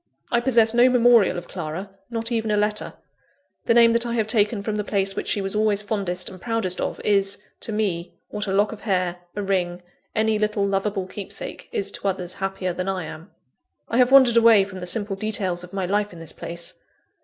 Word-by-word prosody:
I 235 - +3
possess 235 -3 +3
no 240 +2 +6
memorial 240 -6 +5
of 175 - -7
Clara, 175 +3 -6 0.2
not 230 0 -3
even 225 -2 0
a 210 - +2
letter. 210 0 -1 0.7
The 230 - +3
name 230 -1 +7
that 235 0 +3
I 235 -1 -3
have 220 -2 +1
taken 210 -1 +1
from 210 0 -2
the 210 - -1
place 195 -1 0
which - - -4
she 205 - +1
was 195 +1 -3
always 210 -1 +2
fondest 195 -4 -1
and 185 -1 -8
proudest 225 -6 -1
of, - - -3
is, 195 -1 +2 0.2
to - - -5
me, 185 -5 -2
what 210 0 -4
a - - -1
lock 200 +2 +2
of 220 - -9
hair, 185 -4 0 0.2
a 205 - -2
ring, 180 -2 -1 0.3
any 220 0 +2
little 210 -1 0
loveable 195 0 -1
keepsake, 190 +1 -7
is 200 0 -1
to 200 - -4
others 185 -2 -1
happier 195 -2 -3
than 185 +2 -3
I 190 -2 -2
am. 160 +3 -9 0.6
I 230 - 0
have 250 -1 +5
wandered 260 -4 +7
away 230 -3 +7
from 190 -1 -8
the 180 - -5
simple 200 +1 0
details 195 -4 -2
of 180 - -11
my 195 -1 -2
life 205 +2 0
in 175 - -12
this 165 -2 -5
place. 170 0 -6
200 Hz, 215 wpm, -23 LUFS, 185-220 Hz, 0.7 s, name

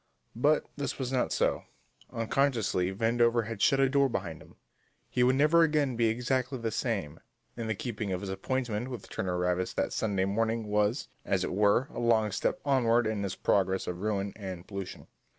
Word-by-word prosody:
But 145 +6 +3
this 140 - -3
was 130 -2 -3
not 130 -2 0
so. - - 0 0.5
Unconsciously, 115 -6 +1
Vandover 115 +2 +2
had 110 -1 -6
shut 135 - +4
a 135 - +5
door 140 0 +3
behind 85 -8 -4
him; - - -17 0.5
he 125 - -1
would 125 +1 +4
never 155 +4 +5
again 150 -5 +2
be 115 0 +2
exactly 125 +3 0
the 115 -2 -3
same, 100 - -2 0.4
and 115 -2 -4
the 110 - 0
keeping 105 -2 -4
of 90 0 -2
his 100 -1 -4
appointment 120 +3 -2
with 125 -6 -7
Turner 90 -1 -2
Ravis 90 +1 -1
that - - -1
Sunday 100 -4 0
morning 110 +3 0
was, 105 +4 0 0.2
as - - 0
it - - -2
were, 105 +6 +3
a - - -5
long 110 -3 +2
step 95 - -1
onward 120 -4 +3
in 110 -2 -1
his 100 -2 -3
progress 95 -1 +1
of 90 0 -5
ruin 100 -2 -1
and 95 -4 -7
pollution. 100 -2 -7
115 Hz, 185 wpm, -29 LUFS, 100-125 Hz, 0.5 s, a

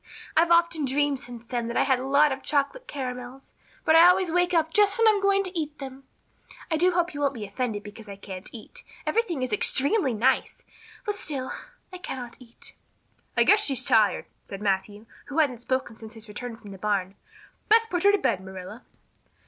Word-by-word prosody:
I've 330 +1 +4
often 335 -3 +3
dreamed 280 +1 +1
since 240 -2 -9
then 240 -1 -3
that 235 - -3
I - - +4
had 265 -2 +2
a 260 - -5
lot 285 +2 +4
of 265 0 -4
chocolate 300 - -1
caramels, 255 -1 -7 0.3
but 315 - +5
I 335 +2 +9
always 360 -1 +3
wake 355 +1 +2
up 320 -2 +1
just 410 0 +4
when 455 -1 +4
I'm 420 -2 +4
going 395 0 +3
to 370 -1 -4
eat 305 -2 -3
them. 270 -1 -9 0.7
I - - +3
do 350 +4 +4
hope 350 0 0
you 290 - -6
won't 280 -1 0
be 215 -3 -5
offended 205 0 -3
because 210 +1 -11
I 200 - -7
can't 190 -2 -8
eat. 365 - -9 0.2
Everything 350 - 0
is 255 - -3
extremely 280 - +2
nice, 250 +5 +1 0.4
but 415 -1 -2
still 270 -8 -3 0.4
I 365 - -7
cannot 250 -9 -7
eat." 240 -2 -10 0.6
"I - - +6
guess 420 - +5
she's 270 -4 0
tired," 215 -2 +3 0.2
said 195 - -8
Matthew, 205 +1 -2 0.2
who 285 - -7
hadn't 275 -7 +2
spoken 260 -2 -2
since 220 +1 -11
his 225 0 -11
return 230 +2 -7
from 210 -3 -12
the 195 - -10
barn. 195 -2 -1 0.6
"Best 450 +1 +5
put 355 -1 0
her 405 - +6
to 410 - +3
bed, 200 - 0
Marilla." 190 +4 -9
270 Hz, 205 wpm, -26 LUFS, 230-340 Hz, 0.7 s, I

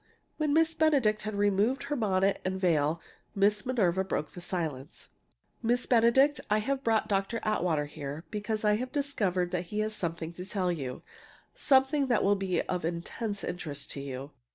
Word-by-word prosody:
When 305 -2 0
Miss 325 +2 +3
Benedict 280 -10 +2
had 215 +1 -4
removed 205 +5 +2
her 295 - -2
bonnet 195 -5 +1
and 190 0 -2
veil 160 -3 +2 0.4
Aunt 205 0 +3
Minerva 190 -7 +2
broke 165 -5 -3
the 175 - -9
silence: 155 -7 -4 0.5
"Miss 245 +2 +1
Benedict, 255 +5 +4
I 210 - +3
have 270 +5 -1
brought 225 -2 +2
Dr. 195 +3 0
Atwater 175 -8 +1
here 145 +1 -7
because 215 +1 -2
I 210 0 +4
have 255 +2 -4
discovered 200 -12 0
that 180 -1 -2
he 210 +5 -2
has 215 0 -1
something 170 -3 -3
to 180 - -7
tell 185 -2 -1
you 135 -7 -5 0.5
something 270 +1 +3
that 240 -4 +2
will 200 - +4
be 190 -2 -1
of 180 -2 -3
intense 175 +5 -3
interest 155 -5 -5
to 140 - -5
you. 135 0 -6
200 Hz, 175 wpm, -29 LUFS, 175-235 Hz, 0.5 s, Benedict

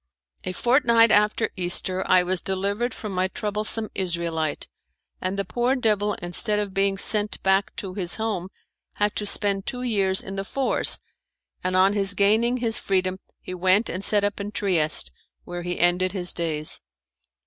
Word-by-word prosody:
A 185 - -2
fortnight 235 +1 +3
after 210 +2 +2
Easter 185 +1 +1
I 185 -1 +4
was 180 0 0
delivered 200 +5 -2
from 215 -2 -7
my 185 0 0
troublesome 215 +2 -1
Israelite, 170 -4 -2 0.5
and 185 +2 -3
the 200 - -2
poor 245 +6 0
devil 210 -4 0
instead 175 +4 +1
of 205 -2 -3
being 195 0 0
sent 210 +1 +5
back 190 +1 +1
to 190 -2 -6
his 180 -3 +2
home 210 -5 -3 0.4
had 205 0 -1
to 210 - -2
spend 200 -1 0
two 250 -1 -4
years 195 -6 0
in 195 0 -8
The 195 - -2
Fours, 265 +6 +1 0.7
and 185 0 -1
on 190 +2 +4
his 200 -1 +4
gaining 220 +5 +2
his 230 -3 -2
freedom 185 -1 -1 0.2
he 185 - -8
went 185 +5 +1
and 185 +3 -5
set 205 -1 +3
up 205 0 -2
in 200 +1 -5
Trieste, 160 - 0 0.3
where 175 0 -7
he 175 0 -4
ended 180 +1 +1
his 180 -3 0
days. 155 -3 -2
195 Hz, 170 wpm, -23 LUFS, 185-210 Hz, 0.7 s, sent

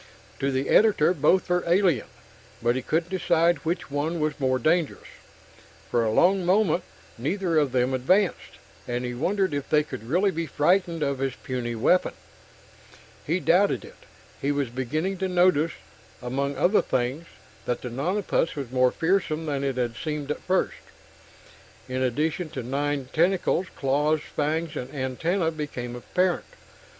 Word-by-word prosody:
To 135 - 0
the 135 0 -1
editor, 200 -6 +5
both 170 +4 +2
were 180 0 +1
alien 175 - +2 0.5
but 120 +1 +1
he 130 - -1
couldn't 165 +7 -1
decide 175 -2 +2
which 165 -2 -3
one 155 +4 -1
was 155 0 -1
more 130 -1 +2
dangerous. 155 +4 0 0.9
For 120 - +2
a 110 - +1
long 185 - +4
moment, 185 -1 +3 0.4
neither 170 - +1
of 145 -4 +1
them 125 +1 +1
advanced, 180 +10 +1 0.3
and 120 0 -2
he 125 - -3
wondered 185 +7 0
if 145 -1 -3
they 150 -1 +4
could 125 -6 -8
really 190 +6 +3
be 165 -2 -3
frightened 170 +2 +1
of 140 -2 -1
his 135 -2 -1
puny 120 -2 -3
weapon. 155 +11 +2 1.1
He 170 +5 +1
doubted 180 +6 +2
it. - - -16 0.3
He 140 - +1
was 140 -3 -1
beginning 155 +10 -2
to 190 - 0
notice, 175 -3 +3 0.5
among 135 +3 -2
other 185 +9 +4
things, 130 +7 -2 0.4
that 125 - -2
the 125 - -5
nonapus 170 - 0
was 135 -5 -5
more 130 -1 +4
fearsome 165 -2 0
than 140 -3 -2
it 135 -2 -1
had 120 -2 -1
seemed 150 +1 -4
at - - -3
first 185 +1 0 1.1
in 130 0 -3
addition 155 +6 -1
to 130 -4 -5
nine 140 +1 -2
tentacles, 180 +2 +2
claws, 150 +3 +1
fangs 155 +2 -1
and 125 +1 -5
antenna 160 +7 0
became 135 -6 -5
apparent. 180 +8 0
150 Hz, 155 wpm, -25 LUFS, 130-175 Hz, 1.1 s, editor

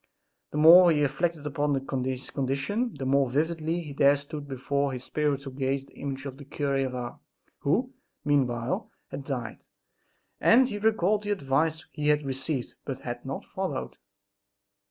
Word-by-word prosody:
The - - -5
more 170 +3 +9
he 150 -2 +2
reflected 155 +2 -1
upon 145 0 0 0.3
his 130 0 -4
condition 140 - -1
the 135 -2 -5
more 135 0 +3
vividly 160 +2 -1
there 140 0 +5
stood 145 +1 -7
before 140 +1 -1
his 125 0 -5
spiritual 140 -3 -1
gaze 135 0 -1
the - - -21
image 135 -1 -5
of 135 -1 -6
the 145 - -10
cure 140 0 -2
of 125 - -6
Ars 120 -1 -5 0.4
(who, 245 - +1 0.3
meanwhile, 125 -4 +1 0.2
had 140 - -6
died), 125 -6 -4 0.8
and 250 +3 +6
he 205 -4 -4
recalled 215 -1 +2
the 205 - -5
advice 160 -3 0
he 150 -1 -3
had 150 -1 +3
received 135 0 -3
but 135 -3 -5
had 120 -1 -5
not 135 - -4
followed. 190 -9 -4
145 Hz, 155 wpm, -28 LUFS, 135-160 Hz, 0.8 s, more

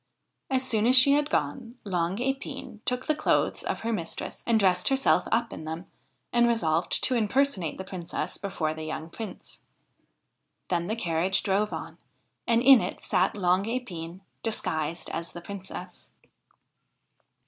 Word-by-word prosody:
As 260 -1 +1
soon 225 -3 +2
as 255 - +6
she 265 +2 +8
had 295 +1 +3
gone, 245 -5 -2
Long 180 -1 -1
Epine 270 -3 -4
took 250 0 -1
the 310 - +2
clothes 305 - +1
of - - -3
her 230 +1 -1
mistress 170 -6 -5
and 230 -2 +4
dressed 185 -3 +3
herself 270 0 +3
up 230 +1 +1
in - - -7
them, 160 +3 -5 0.5
and 240 0 +5
resolved 170 -8 +1
to 260 - +3
impersonate 230 - +1
the 190 - -5
Princess 185 -3 -5
before 175 -6 -2
the 160 - -8
young 160 +1 -5
Prince. 215 -2 -9 1.1
Then 175 -1 0
the 220 - -1
carriage 175 -2 +1
drove 205 +2 +1
on, - - -6 0.5
and 235 0 +3
in 265 -2 +8
it 180 - -5
sat 185 +3 +1
Long 185 0 +2
Epine 185 -8 -5 0.2
disguised 165 -7 -2
as 170 0 -4
the 175 - -7
Princess. 190 +1 -9
200 Hz, 155 wpm, -27 LUFS, 175-240 Hz, 1.1 s, she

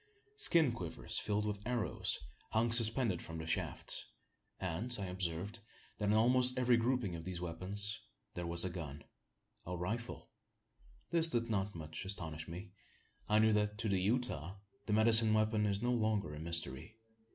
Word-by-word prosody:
Skin 165 - +6
quivers 85 -8 -3
filled 105 0 -1
with 105 -1 -3
arrows, 120 -7 -1 0.4
hung 115 +1 +2
suspended 115 -4 +3
from 80 - -7
the 80 - -5
shafts; 85 - -2 0.5
and 95 +7 -3
I 100 - -3
observed 90 +3 -4 0.4
that, 105 - -1
in 105 - +3
almost 125 +3 +4
every 125 -1 +4
grouping 115 -5 0
of 80 - -7
these 90 -1 -5
weapons, 95 +5 -3 0.3
there 90 -1 -4
was 85 +1 +4
a 90 - -2
gun 75 -5 -7 0.6
a 90 0 -5
rifle. 110 +7 -5 0.8
This 165 -1 +5
did 115 -4 -1
not 100 -1 -1
much 80 +1 -6
astonish 80 -5 -4
me. 90 +4 -8 0.6
I 105 - +4
knew 110 0 +5
that, 105 0 0
to 110 0 -2
the 95 -2 +1
Utah, 100 - -1 0.3
the 105 - 0
medicine 110 0 +6
weapon 110 0 +2
is 100 +2 -1
no 120 - +1
longer 110 -9 0
a 75 - -7
mystery. 85 +3 -3
105 Hz, 165 wpm, -35 LUFS, 85-115 Hz, 0.8 s, Skin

